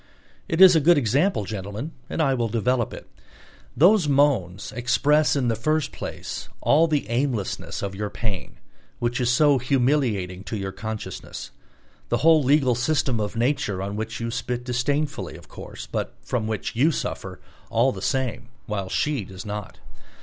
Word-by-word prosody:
It 165 +2 0
is 185 -2 +10
a - - +6
good 165 +3 +5
example, 140 - +2
gentlemen, 105 - -5 0.2
and 160 - 0
I 135 -3 +2
will 120 -3 0
develop 120 +1 0
it. - - -9 0.7
Those 180 - +5
moans 125 -10 +2
express 145 +6 +2
in 135 -3 +1
the 115 - +1
first 155 +6 0
place - - -6
all 160 +3 +4
the 150 -8 0
aimlessness 120 -5 -2
of 100 -1 -3
your 105 +1 -3
pain, 100 -5 -4 0.4
which 120 +1 -1
is 120 - +2
so 140 +2 +4
humiliating 125 -8 0
to 110 - -4
your 95 -1 -3
consciousness; 110 +2 -6 0.6
the - - +2
whole 160 -2 +7
legal 135 -1 +3
system 125 -1 0
of 105 0 -3
nature 120 -5 0
on 100 +2 -4
which 110 +1 -4
you 115 0 -3
spit 125 0 -3
disdainfully, 140 +4 -1
of - - -16
course, - - -9
but - - -4
from 110 - -2
which 110 -1 -3
you 135 +7 +4
suffer 155 - -4 0.3
all 120 +4 +3
the 95 - -7
same 130 -1 -2 0.2
while 100 -3 -3
she 145 -2 0
does 95 +1 -9
not. 105 -1 -6
125 Hz, 165 wpm, -24 LUFS, 105-145 Hz, 0.7 s, is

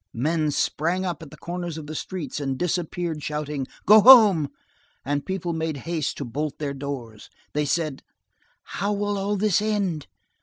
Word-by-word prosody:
Men 155 +5 +1
sprang 170 +5 0
up 175 -3 -3
at 160 - -9
the 155 - -13
corners 175 -2 -5
of 155 - -7
the 155 - -7
streets 155 -3 -5
and 135 -2 -2
disappeared, 175 -1 -2
shouting: 150 -2 -3 0.2
"Go 215 +2 +8
home!" 210 - +8 0.6
And 145 +1 -2
people 185 -3 -2
made 160 -2 -2
haste 165 -3 -2
to 140 - -4
bolt 145 +5 -3
their 145 -2 -3
doors. 135 -6 -7 0.2
They 150 0 0
said: 155 -2 -1 0.6
"How 200 +3 -2
will 205 0 -1
all 200 +1 -1
this 205 -1 +2
end?" 200 -8 -1
160 Hz, 165 wpm, -24 LUFS, 145-185 Hz, 0.6 s, Go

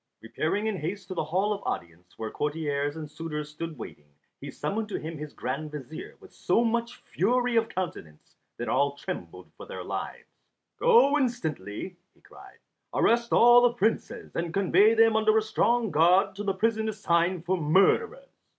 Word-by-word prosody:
Repairing 160 - -2
in 215 -3 -1
haste 185 +6 -5
to - - -3
the 170 - -2
hall 190 +7 0
of 205 - -6
audience, 85 +1 -6
where 110 -1 -5
courtiers 145 -1 -2
and 155 -1 -6
suitors 150 -1 -6
stood 165 +1 -6
waiting, 75 0 -10 0.3
he - - -8
summoned 215 +1 -3
to - - -3
him 160 +1 -6
his 150 -1 -7
grand 145 +4 -4
vizier 150 0 -8
with - - -17
so 230 +6 +1
much 235 +1 -1
fury 245 0 0
of 225 0 +2
countenance 125 - -6 0.2
that - - -4
all 140 +1 +1
trembled - - -7
for - - -10
their - - -7
lives. - - -7 0.4
"Go 455 - +5
instantly," 175 - -3 0.2
he - - -28
cried, - - -16 0.4
"arrest 235 +1 +2
all 240 +1 +7
the 245 -1 +4
Princes, 225 -1 -2
and 170 0 -3
convey 200 +3 +4
them 225 0 +5
under 220 0 +3
a - - +4
strong 225 0 +1
guard 180 +5 +4
to 205 - -5
the 195 -2 -1
prison 220 +2 0
assigned 175 -4 0
for 185 +2 +1
murderers!" 195 - +2
185 Hz, 175 wpm, -27 LUFS, 150-225 Hz, 0.4 s, all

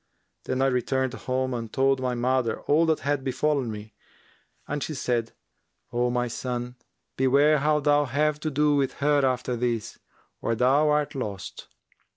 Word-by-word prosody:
Then 130 +1 0
I - - +4
returned 130 0 0
home 130 0 -2
and 115 -3 -5
told 135 0 +2
my 125 -1 -1
mother 120 -1 0
all 160 +3 +3
that 160 -1 +1
had 140 -1 -1
befallen 135 0 0
me, 105 0 -9 0.7
and 145 0 -3
she 155 - -3
said, 120 -4 -1 0.6
'O 120 +1 +1
my 125 0 0
son, 125 +1 -4 0.4
beware 140 +3 +4
how 150 +2 +2
thou 145 0 +3
have 150 +3 0
to 155 - -2
do 150 +1 +2
with 140 -2 +1
her 145 0 +2
after 125 -1 0
this, 115 -2 -2 0.4
or 115 - 0
thou 135 +6 +3
art 150 -1 +1
lost.' 100 -9 -6
130 Hz, 165 wpm, -26 LUFS, 125-145 Hz, 0.7 s, I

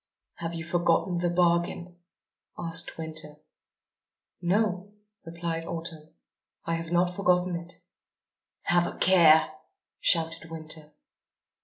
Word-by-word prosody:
"Have 170 0 -4
you 165 - -4
forgotten 175 +1 +1
the 175 0 0
bargain?" 175 0 0 0.6
asked 165 0 +2
Winter. 155 -2 -4 1.1
"No," 195 +1 0 0.3
replied 165 0 -4
Autumn. 165 -2 -5 0.6
"I 165 - -1
have 165 0 -4
not 175 +1 +2
forgotten 180 -2 +1
it." 170 +1 -4 0.9
"Have 175 0 +2
a - - -7
care," 160 -4 +6 0.5
shouted 165 -1 +1
Winter. 155 -1 -5
170 Hz, 105 wpm, -27 LUFS, 165-175 Hz, 1.1 s, care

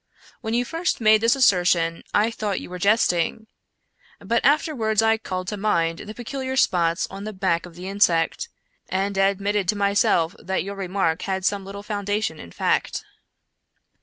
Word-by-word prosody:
When 225 -1 -2
you 245 +1 +1
first 330 +7 -2
made 215 -1 +5
this 230 +3 +4
assertion 175 -9 +3
I 215 +3 +2
thought 210 -3 -2
you - - -10
were 180 - -6
jesting; 200 0 +2 0.7
but 230 +4 0
afterwards 250 -7 +2
I 225 0 +3
called 185 -3 -5
to 210 - -4
mind 165 -5 0
the 215 - -8
peculiar 260 +2 -4
spots 170 -7 +2
on 195 +1 -7
the 215 - -5
back 185 -3 0
of 170 - -15
the 180 +2 -8
insect, 195 - +1 0.4
and 195 +1 -1
admitted 195 0 +1
to 210 - +2
myself 200 -4 +2
that 190 +1 -2
your 200 +1 -6
remark 185 -3 -1
had 190 -1 -2
some 200 -1 0
little 200 +1 -8
foundation 205 -4 -2
in 85 - -11
fact. - - -1
200 Hz, 165 wpm, -23 LUFS, 180-220 Hz, 0.7 s, made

